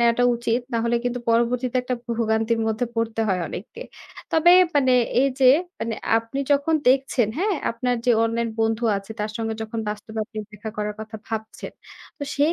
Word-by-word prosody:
নেওয়াটা 235 Hz, +1 st, +3 dB
উচিত। 235 Hz, 0 st, 0 dB
না 230 Hz, -, +1 dB
হলে 235 Hz, 0 st, +2 dB
কিন্তু 245 Hz, 0 st, -1 dB
পরবর্তীতে 240 Hz, +2 st, +1 dB
একটা 250 Hz, 0 st, -2 dB
ভো 240 Hz, -, -7 dB
ভোগান্তির 225 Hz, 0 st, +1 dB
মধ্যে 220 Hz, +2 st, 0 dB
পড়তে 225 Hz, -1 st, -1 dB
হয় 185 Hz, -2 st, +1 dB
অনেককে। 230 Hz, -, -8 dB, 0.5 s
তবে 330 Hz, +2 st, +6 dB, 0.2 s
মানে 260 Hz, -3 st, +4 dB, 0.3 s
এই 275 Hz, -, +4 dB
যে 255 Hz, -, +8 dB, 0.3 s
মানে 230 Hz, 0 st, -2 dB, 0.2 s
আপনি 230 Hz, +4 st, -6 dB
যখন 285 Hz, +3 st, +2 dB
দেখছেন, 260 Hz, -4 st, +2 dB
হ্যাঁ? 400 Hz, +3 st, +1 dB, 0.2 s
আপনার 245 Hz, +2 st, -1 dB
যে -, -, +5 dB
অনলাইন 230 Hz, +1 st, -1 dB
বন্ধু 225 Hz, +1 st, +1 dB
আছে 195 Hz, +2 st, -8 dB
তার 210 Hz, +1 st, -2 dB
সঙ্গে 225 Hz, -1 st, -2 dB
যখন 220 Hz, +1 st, -4 dB
বাস্তবে 215 Hz, +1 st, -6 dB
আপনি 215 Hz, -, -9 dB
দেখা 210 Hz, +1 st, -7 dB
করার 210 Hz, 0 st, -2 dB
কথা 220 Hz, 0 st, -7 dB
ভাবছেন। 220 Hz, -1 st, -6 dB, 0.5 s
তো -, -, -6 dB
সেই 295 Hz, +4 st, +3 dB
230 Hz, 180 wpm, -23 LUFS, 220-250 Hz, 0.5 s, যে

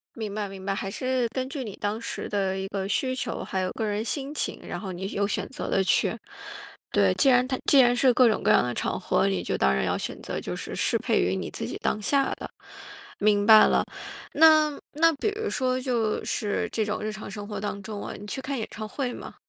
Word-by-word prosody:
明 215 Hz, -3 st, -5 dB
白 205 Hz, -1 st, -3 dB
明 190 Hz, -1 st, -9 dB
白， 195 Hz, -, 0 dB
还 195 Hz, 0 st, -3 dB
是 255 Hz, +3 st, 0 dB
根 260 Hz, -1 st, -2 dB
据 275 Hz, -1 st, -4 dB
你 210 Hz, -5 st, -7 dB
当 205 Hz, +2 st, -2 dB
时 -, -, -4 dB
的 195 Hz, -2 st, -1 dB
一 190 Hz, -, -3 dB
个 195 Hz, -1 st, -3 dB
需 255 Hz, +5 st, 0 dB
求， -, -, -3 dB
还 190 Hz, -, -3 dB
有 185 Hz, 0 st, -1 dB
个 220 Hz, -, -3 dB
人 210 Hz, 0 st, -1 dB
心 275 Hz, +5 st, -3 dB
情， -, -, -2 dB
然 -, -, -4 dB
后 195 Hz, -3 st, -5 dB
你 185 Hz, +2 st, -5 dB
有 200 Hz, 0 st, 0 dB
选 -, -, -2 dB
择 265 Hz, -, -5 dB
地 195 Hz, -, +2 dB
去。 185 Hz, -, +2 dB, 0.7 s
对， 95 Hz, -2 st, +3 dB
既 275 Hz, -, +4 dB
然 250 Hz, 0 st, +4 dB
它 260 Hz, -, -1 dB
既 280 Hz, -, +6 dB
然 245 Hz, -1 st, +6 dB
是 255 Hz, +1 st, +4 dB
各 250 Hz, 0 st, +6 dB
种 215 Hz, -, 0 dB
各 210 Hz, -, +2 dB
样 -, -, +5 dB
的 125 Hz, 0 st, -2 dB
场 -, -, -2 dB
合， 65 Hz, +6 st, +1 dB
你 95 Hz, -3 st, -1 dB
就 -, -, -1 dB
当 65 Hz, 0 st, +3 dB
然 65 Hz, -, 0 dB
要 -, -, 0 dB
选 -, -, -5 dB
择 -, -, -4 dB
就 -, -, -4 dB
是 -, -, -6 dB
适 -, -, +2 dB
配 -, -, +1 dB
于 90 Hz, +2 st, +1 dB
你 95 Hz, -, -4 dB
自 -, -, -4 dB
己 -, -, -5 dB
当 215 Hz, -, -1 dB
下 275 Hz, +6 st, +2 dB
的。 -, -, -6 dB, 0.7 s
明 205 Hz, 0 st, +3 dB
白 215 Hz, 0 st, +9 dB
了， -, -, +3 dB, 0.5 s
那 310 Hz, -1 st, +6 dB, 0.2 s
那 330 Hz, +2 st, +4 dB
比 355 Hz, -, 0 dB
如 440 Hz, -, -1 dB
说 255 Hz, 0 st, 0 dB
就 240 Hz, -4 st, -1 dB
是 205 Hz, -3 st, -1 dB
这 220 Hz, -, 0 dB
种 210 Hz, +1 st, -3 dB
日 215 Hz, +1 st, -2 dB
常 215 Hz, 0 st, -8 dB
生 205 Hz, 0 st, -6 dB
活 205 Hz, -2 st, -5 dB
当 200 Hz, -1 st, -4 dB
中 210 Hz, 0 st, -6 dB
啊， -, -, -5 dB
你 205 Hz, -, -9 dB
去 265 Hz, -, -4 dB
看 270 Hz, +1 st, -3 dB
演 220 Hz, -, -2 dB
唱 215 Hz, 0 st, -6 dB
会 250 Hz, +2 st, -3 dB
吗？ -, -, -9 dB
215 Hz, 270 characters per minute, -26 LUFS, 195-255 Hz, 0.7 s, 白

